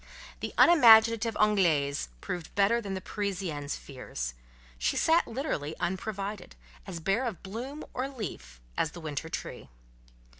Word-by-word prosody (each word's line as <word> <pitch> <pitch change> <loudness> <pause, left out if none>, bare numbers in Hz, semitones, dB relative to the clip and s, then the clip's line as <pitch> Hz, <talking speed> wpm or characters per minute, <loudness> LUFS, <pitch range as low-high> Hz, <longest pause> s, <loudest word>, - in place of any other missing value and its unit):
The - - -4
unimaginative 230 -7 +7
"Anglaise" 165 - +2
proved 175 -2 -5
better 205 +4 +3
than 195 -3 -4
the 190 - -4
Parisienne's 185 -9 -3
fears: 65 - -6 0.5
she 60 - 0
sat 330 +1 +3
literally 225 - -3
unprovided, 195 +1 -4 0.3
as 180 -3 -5
bare 195 +10 +1
of 220 -8 -4
bloom 245 +10 -6
or 260 +2 -2
leaf 70 - -7 0.2
as 155 - 0
the 175 - -8
winter 155 0 -4
tree. - - -6
195 Hz, 135 wpm, -29 LUFS, 160-230 Hz, 0.5 s, unimaginative